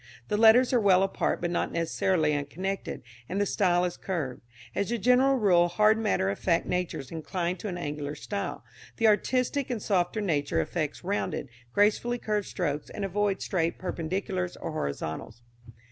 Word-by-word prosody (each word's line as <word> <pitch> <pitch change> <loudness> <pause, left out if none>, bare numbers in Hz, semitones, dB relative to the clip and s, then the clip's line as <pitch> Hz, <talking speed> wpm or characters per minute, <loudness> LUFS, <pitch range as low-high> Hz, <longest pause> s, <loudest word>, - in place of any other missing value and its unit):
The - - +1
letters 230 +4 +6
are 245 - +5
well 190 -3 +5
apart 195 - -1
but 175 0 -1
not 175 - -1
necessarily 165 -1 +1
unconnected, 170 +8 -3 0.3
and 190 - -1
the 205 - +2
style 180 -3 +2
is 175 - -3
curved. 155 -10 -3 0.3
As 200 +2 -1
a 235 - +1
general 250 +4 +4
rule 180 -8 +4
hard 215 +5 +3
matter 200 - +1
of 100 - -6
fact 170 -2 +1
natures 180 -7 -3
incline 170 +2 -2
to 210 - -6
an 180 -3 -4
angular 145 -3 -4
style; 200 -1 -4 0.3
the 225 - +1
artistic 255 +5 +2
and 245 -3 -2
softer 190 0 0
nature 155 -8 0
affects 155 -2 -2
rounded, 200 -7 -2 0.2
gracefully 215 - +2
curved 210 -3 -2
strokes, 150 -5 -2
and 200 - -4
avoids 195 0 0
straight 170 -3 0
perpendiculars 180 +1 -3
or - - -4
horizontals. 80 - -4
185 Hz, 165 wpm, -28 LUFS, 165-210 Hz, 0.3 s, letters